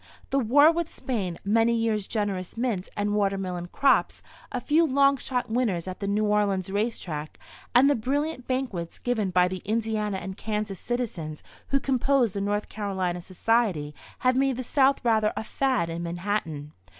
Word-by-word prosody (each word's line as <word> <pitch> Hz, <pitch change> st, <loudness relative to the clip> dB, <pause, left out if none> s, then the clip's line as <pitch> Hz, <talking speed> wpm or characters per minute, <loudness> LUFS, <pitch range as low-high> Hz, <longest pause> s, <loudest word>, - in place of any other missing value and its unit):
The 275 Hz, -, +3 dB
war 285 Hz, +6 st, +6 dB
with 335 Hz, -1 st, -2 dB
Spain, 195 Hz, -, -3 dB
many 225 Hz, +3 st, +3 dB
years' 220 Hz, -3 st, 0 dB
generous 200 Hz, -3 st, -2 dB
mint 230 Hz, -6 st, -1 dB
and 205 Hz, 0 st, 0 dB
watermelon 195 Hz, -4 st, -1 dB
crops, 275 Hz, +9 st, +2 dB, 0.3 s
a 250 Hz, -, -2 dB
few 300 Hz, +7 st, +3 dB
long 280 Hz, -2 st, +4 dB
shot 250 Hz, -1 st, -2 dB
winners 215 Hz, -8 st, 0 dB
at 185 Hz, -, -6 dB
the 200 Hz, -, -3 dB
New 210 Hz, +2 st, +1 dB
Orleans 200 Hz, -3 st, +1 dB
race 215 Hz, +4 st, 0 dB
track, 155 Hz, -3 st, -6 dB, 0.4 s
and 255 Hz, +3 st, +7 dB
the 285 Hz, -, +5 dB
brilliant 280 Hz, +3 st, -2 dB
banquets 245 Hz, -11 st, -3 dB
given 225 Hz, -5 st, -1 dB
by 180 Hz, 0 st, +4 dB
the 185 Hz, 0 st, -5 dB
Indiana 215 Hz, -2 st, -1 dB
and 190 Hz, 0 st, -6 dB
Kansas 210 Hz, -3 st, -3 dB
citizens 190 Hz, -11 st, -4 dB, 0.2 s
who 275 Hz, -, +2 dB
compose 265 Hz, -4 st, +2 dB
the 200 Hz, -, -2 dB
North 205 Hz, +1 st, -1 dB
Carolina 190 Hz, -4 st, -2 dB
Society 185 Hz, -5 st, 0 dB, 0.3 s
have 255 Hz, 0 st, +4 dB
made 265 Hz, -1 st, +2 dB
the 255 Hz, -, -3 dB
South 270 Hz, +1 st, +2 dB
rather 220 Hz, -2 st, +3 dB
a -, -, -2 dB
"fad" 255 Hz, -6 st, 0 dB
in 165 Hz, +1 st, -4 dB
Manhattan. 170 Hz, -4 st, -3 dB
215 Hz, 170 wpm, -26 LUFS, 185-250 Hz, 0.4 s, and